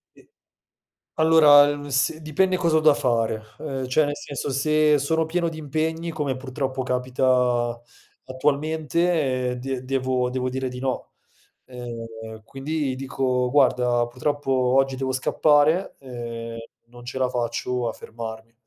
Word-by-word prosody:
E - - -22 0.9
Allora 145 -2 +5
s 135 +3 +1
dipende 185 +5 +1
cosa 170 -3 +2
ho - - +5
da 155 -1 +5
fare, 115 -4 0 0.2
uhm, 135 -4 -4
cioè 150 +4 +3
nel 145 0 -2
senso, 140 0 -5
se 150 +2 +3
sono 160 +3 0
pieno 170 +1 -1
di 160 - -9
impegni, 160 +2 -2
come 150 -5 -2
purtroppo 130 0 -3
capita 125 -1 +1 0.5
attualmente, 150 -1 0
eh - - -3
de 130 0 -4
devo 130 -1 0 0.2
dire 130 0 -3
di 125 0 -7
no; 130 -1 -3 0.5
ehm, 115 -3 -8
quindi 140 +1 -3
dico: 130 -2 -1
"Guarda, 125 -4 +3
purtroppo 135 +3 -2
oggi 130 +1 +2
devo 130 0 -2
scappare, 150 +6 +2
ehm, 115 -3 -7 0.3
non 120 0 -14
ce 125 +2 -6
la 130 -1 +1
faccio 120 0 -2
a 115 - -3
fermarmi." 110 0 -8
130 Hz, 135 wpm, -24 LUFS, 125-150 Hz, 0.9 s, Allora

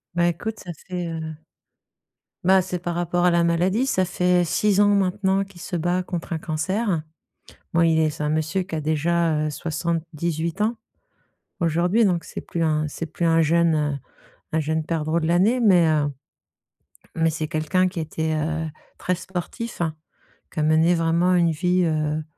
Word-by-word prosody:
Bah, 175 0 +3
écoute, 210 +6 -3
ça 175 - -7
fait, 180 +2 -5
heu 165 -1 -4 1.2
bah, 190 +1 +5
c'est 180 0 -3
par 175 0 -4
rapport 175 +1 0
à 180 - +5
la 170 0 +3
maladie, 185 +9 +1
ça 185 -7 +2
fait 180 0 +2
6 200 +4 +1
ans 205 0 +5
maintenant 195 0 +1
qu'il 195 -3 -14
se 180 - -5
bat 175 +2 0
contre 175 -2 -5
un 160 - -1
cancer. 170 +4 -1 0.7
Bon, 170 - +4
il 165 -1 +3
est 155 - +3
c'est 150 0 -5
un 150 - 0
monsieur 155 +4 0
qui 175 - -7
a 155 - -1
déjà, 160 +1 +1
heu, - - -1
78 165 +2 -2
ans, 225 +2 +1 0.8
aujourd'hui 175 +7 +2
donc 175 -4 +1
c'est - - -7
plus 165 -1 -2
un 155 -1 +1
c'est 165 +3 -5
plus 170 - -4
un 165 0 +4
jeune 155 -3 +2 0.5
un 160 - +1
jeune 155 +1 -1
perdreau 160 0 0
de 160 - -2
l'année 195 +9 +3
mais 180 -7 +5
heu 155 -2 +2 1.1
mais 165 0 +3
c'est 155 -1 -3
quelqu'un 180 +3 +1
qui 180 -1 -7
était, 160 0 -2
heu, 160 +1 -1 0.3
très 180 - -1
sportif, 190 +5 -6
hein, 160 -2 -1 0.6
qui - - -5
a - - +2
mené 160 +3 +4
vraiment 170 +2 +2
une 170 -2 +3
vie, 180 +3 +1
heu, 155 -1 0
170 Hz, 180 wpm, -23 LUFS, 160-180 Hz, 1.2 s, bah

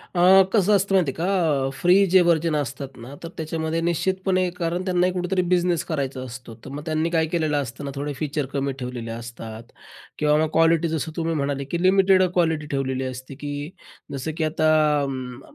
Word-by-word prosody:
अ, 175 - +2 0.3
कसं 210 -1 +4
असतं 195 0 +1
माहिती 165 -8 +3
आहे - - -16
का? 165 -7 +1
अ, - - -2
फ्री 180 +7 +4
जे 185 +1 +5
व्हर्जन 165 -2 +2
असतात 135 -1 -4
ना, 120 +4 -10
तर 165 - -5
त्याच्यामध्ये 160 +1 -2
निश्चितपणे 185 +2 0
कारण 175 +2 -2
त्यांनाही 180 0 +1
कुठेतरी 180 +1 0
बिझनेस 175 -2 +1
करायचा 140 -4 -3
असतो. 125 -2 -9
तर - - -7
मग 145 +1 -6
त्यांनी 160 +1 0
काय 165 -2 +2
केलेलं 155 -3 0
असतं 135 +1 -4
ना, 140 - -4
थोडे 145 +1 -3
फीचर 150 -2 -2
कमी 140 0 -1
ठेवलेले 125 -2 -5
असतात 115 -1 -8 0.5
किंवा 150 0 +3
मग 155 - -1
क्वालिटी 165 0 +4
जसं 160 0 -2
तुम्ही 165 -1 -1
म्हणाले, 140 -1 -1
की 170 +5 -3
लिमिटेड 190 0 +5
क्वालिटी 160 -4 +1
ठेवलेली 130 -1 -1
असते, 130 +1 -7
की 145 +1 -5 0.4
जसं 135 +4 -3
की 160 - 0
आता 155 0 +1 0.4
अं, 130 -2 -5
155 Hz, 190 wpm, -23 LUFS, 135-175 Hz, 0.5 s, जे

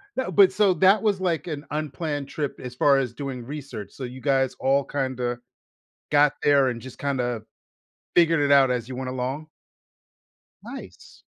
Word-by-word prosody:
No, 260 - -2
but 195 -2 +6
so 200 -3 +3
that 190 +5 +5
was, 205 -3 +1
like, 180 -3 -1
an 150 -3 -5
unplanned 150 -1 -3
trip 145 -3 -4
as 125 0 -7
far 140 +2 +4
as 120 -3 -3
doing 135 -4 -5
research. 135 -7 -7
So, 135 - -8
you 125 +1 -7
guys 135 -2 +1
all 135 +1 +2
kinda 130 -3 -3 0.7
got 145 0 +5
there 140 -2 +4
and 120 -2 -4
just 130 +1 -11
kinda 125 -5 -2 0.7
figured 165 -2 +4
it 145 -1 +2
out 135 -2 +6
as 125 -2 -2
you 130 - -6
went 130 0 -4
along? 130 +5 -4 1.1
Nice. - - -11
140 Hz, 170 wpm, -24 LUFS, 130-155 Hz, 1.1 s, but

